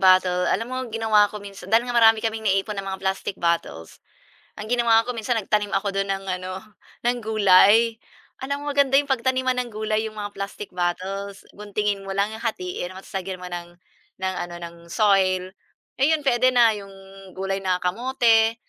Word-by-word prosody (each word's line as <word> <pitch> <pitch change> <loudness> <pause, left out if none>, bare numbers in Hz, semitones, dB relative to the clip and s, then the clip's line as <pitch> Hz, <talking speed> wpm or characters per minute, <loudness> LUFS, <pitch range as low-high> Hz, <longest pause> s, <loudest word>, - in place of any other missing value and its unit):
bottle, 185 -1 +4
alam 225 +4 0
mo 255 - -4
ginawa 220 -2 +3
ko 210 - -9
minsan 200 -2 -11
dahil 225 +3 +4
nga 245 - -3
marami 225 -1 +6
kaming 220 -1 -1
naiipon 195 +2 0
na 195 - -4
mga 190 0 -4
plastic 190 0 -2
bottles, 170 - -2 0.5
ang 215 +1 -8
ginawa 235 -2 +4
ko 245 - -5
minsan, 230 +2 -1
nagtanim 205 0 -1
ako 200 +1 0
do'n 195 0 -2
ng 195 0 -4
ano, 185 0 -6 0.5
ng 245 +1 +1
gulay. 215 +2 +5 0.4
Alam 280 +2 -3
mo, - - -8
maganda 280 -1 +2
'yong 285 0 -1
pagtaniman 260 0 +1
ng 250 -1 -2
gulay, 215 0 -1
'yong 215 - -8
mga 205 -1 -4
plastic 200 +1 -6
bottles. 190 +3 -3
Guntingin 205 -1 -2
mo 195 - -4
lang, 200 +2 +1
'yong 220 - -8
hatiin 180 -4 -4
mo, 190 - -9
tapos - - -16
lagyan 185 -1 -6
mo 180 - -6
ng, 175 -1 -6 0.5
ng 190 0 -1
ano, 175 - -10
ng 170 0 -8
soil, 185 -2 +2 0.5
ayun 300 +3 +2
puwede 255 -2 +3
na, 235 -2 +6
'yong 195 -1 -9 0.4
gulay 195 +1 -2
na 185 -2 -1
kamote, 225 +2 +2
205 Hz, 185 wpm, -23 LUFS, 190-230 Hz, 0.5 s, marami